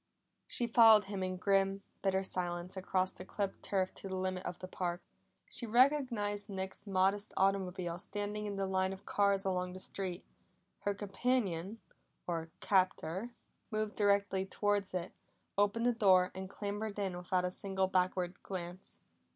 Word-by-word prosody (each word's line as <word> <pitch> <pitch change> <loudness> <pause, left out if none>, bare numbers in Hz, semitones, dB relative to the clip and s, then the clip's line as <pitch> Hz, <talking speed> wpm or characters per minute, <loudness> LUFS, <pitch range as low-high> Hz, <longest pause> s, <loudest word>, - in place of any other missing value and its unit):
She 240 - 0
followed 225 -2 +8
him 195 -1 -4
in 185 0 -2
grim, 195 +1 +2 0.2
bitter 190 -1 +1
silence 175 -1 -2
across 185 0 0
the - - -8
clipped 195 +1 -3
turf 190 -2 0
to - - -8
the 190 - -3
limit 185 0 -2
of 175 - -4
the 185 - -7
park. 175 -1 -3 0.4
She 235 - -4
recognized 235 -5 +2
Nick's 190 +1 -4
modest 195 +2 +1
automobile 185 -3 +1
standing 205 +2 -3
in 200 - -3
the 195 0 0
line 190 0 +1
of 190 - -11
cars 200 -1 +2
along 180 -1 -1
the 185 - -7
street; 185 -1 -4 0.5
her 205 0 -1
companion, 205 -2 -1 0.4
or 165 -2 -3
captor, 185 +1 +1 0.4
moved 215 -2 -2
directly 200 -2 +2
towards 200 0 0
it, 180 -1 -3 0.4
opened 205 +3 +2
the 245 - +4
door 190 -5 +5
and 190 0 -6
clambered 205 +1 -4
in 195 -3 -1
without 180 +1 0
a 180 - -1
single 190 0 0
backward 185 -1 0
glance. 180 -1 -7
195 Hz, 155 wpm, -34 LUFS, 185-205 Hz, 0.5 s, followed